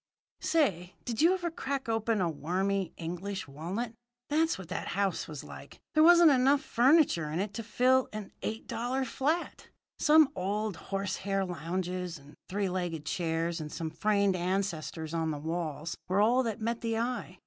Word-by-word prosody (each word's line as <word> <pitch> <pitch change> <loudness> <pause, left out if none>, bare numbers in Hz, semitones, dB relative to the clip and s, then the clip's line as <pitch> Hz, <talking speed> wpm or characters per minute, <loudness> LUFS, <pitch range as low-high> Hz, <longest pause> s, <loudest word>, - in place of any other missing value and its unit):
"Say, 190 - +1
did 235 0 -1
you 335 +3 +6
ever 350 -2 -3
crack 275 -4 -3
open 225 -2 +1
a 175 - +2
wormy 180 +5 -1
English 185 +3 -4
walnut? 180 - -4 0.4
That's 320 +2 +2
what 190 - -9
that 180 - -3
house 195 -3 0
was 150 -3 -7
like. - - -11
There 310 - +4
wasn't 340 -1 +8
enough 275 +2 +4
furniture 250 - +4
in 155 +3 -2
it 200 +1 -2
to 230 - -4
fill 250 +4 +2
an 215 -2 -6
eight 220 +1 -4
dollar 255 +3 -1
flat. 300 +8 -2 0.3
Some 305 -1 +6
old 205 +2 -1
horsehair 195 0 -1
lounges 180 +1 -3
and 140 +1 -16 0.2
three 200 +1 0
legged 175 -4 -3
chairs 165 0 -1
and 150 -1 -6
some 160 -1 -4
framed 200 +2 +2
ancestors 175 -3 -2
on 165 -1 0
the 150 - -2
walls 160 0 -3
were 185 +2 +1
all 235 +5 +4
that 225 -5 -2
met 230 +1 -2
the 225 -1 -1
eye. 240 +2 -3
195 Hz, 170 wpm, -30 LUFS, 170-240 Hz, 0.4 s, wasn't